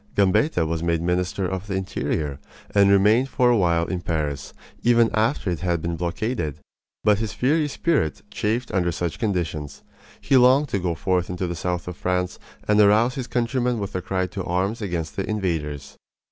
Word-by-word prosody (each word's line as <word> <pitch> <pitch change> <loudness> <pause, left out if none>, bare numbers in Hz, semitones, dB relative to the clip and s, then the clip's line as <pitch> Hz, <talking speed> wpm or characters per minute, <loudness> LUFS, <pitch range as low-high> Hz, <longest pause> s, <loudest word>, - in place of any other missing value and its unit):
Gambetta 100 - +3
was 80 0 -2
made 85 -1 +1
minister 90 +3 -1
of 95 +2 -4
the 95 - -2
interior, 75 -6 -2 0.3
and 100 -1 +5
remained 105 +7 +4
for 125 -1 +3
a - - +4
while 85 -5 +2
in 90 0 -3
Paris 75 -5 -3 0.3
even 120 -1 +4
after 110 -3 +1
it 85 - -3
had 85 -1 0
been 85 +1 -3
blockaded. 85 - -2 0.5
But 105 -1 +4
his 110 -1 -3
fiery 150 +7 +1
spirit 145 - 0
chafed 115 +4 -1
under 90 -2 +1
such 85 0 -3
conditions. 80 -9 -3 0.4
He 135 - +3
longed 130 +3 +5
to 100 - 0
go 85 -2 -1
forth 90 +3 0
into 90 +1 -3
the 85 - -3
south 90 +1 -3
of 90 -1 -6
France 90 0 -1 0.3
and 105 0 +5
arouse 110 +4 +4
his 130 -3 -5
countrymen 125 0 0
with 100 -2 -4
a 90 - -2
cry 95 0 -1
to 95 +1 -5
arms 95 +7 -1
against 85 -5 -3
the 95 - -2
invaders. 80 -9 -3
95 Hz, 185 wpm, -23 LUFS, 85-110 Hz, 0.5 s, and